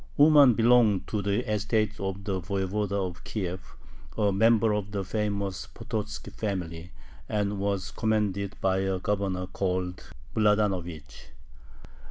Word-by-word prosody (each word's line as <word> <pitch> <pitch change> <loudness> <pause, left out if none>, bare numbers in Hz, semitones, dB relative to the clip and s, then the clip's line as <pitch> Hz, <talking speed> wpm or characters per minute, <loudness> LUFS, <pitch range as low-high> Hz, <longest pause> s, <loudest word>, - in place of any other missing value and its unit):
Uman 145 -4 +7
belonged 115 -4 +4
to 105 - -1
the 100 +1 -1
estate 110 0 0
of 95 0 -4
the 95 -2 -2
Voyevoda 100 +1 -1
of 90 -1 -10
Kiev, 95 -3 -5 0.4
a 105 -2 +3
member 110 +2 +4
of 105 -1 -2
the 100 -2 -3
famous 100 -2 -2
Pototzki 110 -3 -5
family, 90 -4 -4 0.4
and 105 -1 -1
was 100 -2 -1
commanded 105 -3 -1
by 95 0 +1
a 95 0 0
governor 95 -1 -1
called 90 -1 -3 0.2
Mladanovich. 95 - 0
100 Hz, 125 wpm, -27 LUFS, 95-105 Hz, 0.4 s, Uman